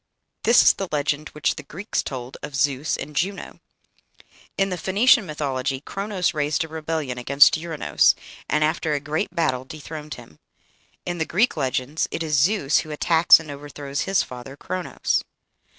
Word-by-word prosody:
This 235 +2 +6
is - - +7
the 195 - -4
legend 150 0 -1
which 150 - -1
the - - -5
Greeks 190 +9 -3
told 130 -1 -7
of 150 -1 -7
Zeus 140 +1 0
and 150 +2 -7
Juno. 195 +6 -3 1.0
In 195 0 +1
the 180 - -2
Phoenician 215 +2 +4
mythology 135 -3 -2
Chronos 195 +3 -2
raised 150 0 0
a - - -7
rebellion 155 -5 -3
against 140 +3 +5
Ouranos, 160 -1 +2 0.3
and, 150 - +2
after 155 0 0
a 145 - 0
great 150 +3 -2
battle, 130 -7 0
dethroned 150 +2 -8
him. 80 - -15 0.7
In 175 -1 -3
the 160 - 0
Greek 210 +8 +2
legends 135 +1 -1
it 165 - -3
is 155 -2 0
Zeus 155 0 +3
who 155 - -6
attacks 160 +3 +5
and 160 -2 -9
overthrows 140 0 -5
his 195 -1 +1
father, 125 +2 -10
Chronos. 185 +3 -2
150 Hz, 165 wpm, -23 LUFS, 140-170 Hz, 1.0 s, is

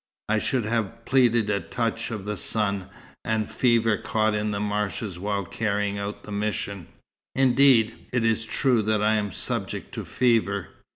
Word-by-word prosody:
I 110 0 +3
should 125 0 0
have 115 0 -2
pleaded 120 -5 +3
a 100 - +1
touch 115 +6 -2
of 110 -4 -5
the 105 0 -2
sun, 100 -1 -1 0.3
and 110 -1 0
a - - -15
fever 115 -3 +2
caught 110 -1 0
in 105 0 -1
the 100 -1 -2
marshes 105 -2 -2
while 100 0 -2
carrying 100 0 -1
out 100 +1 -5
the 105 - -9
mission. 100 -3 -3 0.5
Indeed, 130 -3 +4
it 125 -2 +1
is 115 0 +2
true 120 +1 +2
that 105 0 +1
I 110 +1 +4
am 105 -2 0
subject - - -3
to - - -4
fever. 110 -6 +1
110 Hz, 170 wpm, -25 LUFS, 100-115 Hz, 0.5 s, Indeed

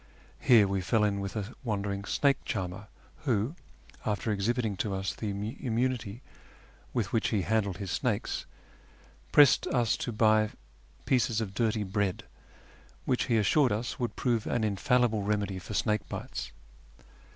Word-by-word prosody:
Here 110 -5 +6
we 95 -1 -1
fell 105 +4 +2
in 100 -1 +1
with 100 +1 -4
a 105 +2 -4
wandering 100 -3 -2
snake 140 +3 +2
charmer, 95 +3 -4 0.3
who, 125 -3 0 0.5
after 110 -1 -1
exhibiting 110 +1 0
to 100 -1 -1
us 95 0 -2
the 110 - -4
immunity 115 +2 -2 0.7
with 110 -5 -2
which 115 - +2
he 105 -4 0
handled 100 -2 0
his 100 -3 -5
snakes, 115 -3 -1 0.8
pressed 145 -4 +6
us 120 -4 +2
to 120 - -3
buy 110 -1 +3 0.6
pieces 115 -3 +2
of 105 -4 -3
dirty 110 0 +1
bread, 95 -1 -1 0.8
which 125 - +1
he 115 - +2
assured 125 +6 +3
us 115 +3 -2
would 120 -2 -2
prove 120 -4 0
an 120 - 0
infallible 110 +1 +2
remedy 100 -2 -1
for 100 +4 -7
snake 105 +3 0
bites. - - -5
110 Hz, 145 wpm, -29 LUFS, 100-120 Hz, 0.8 s, Here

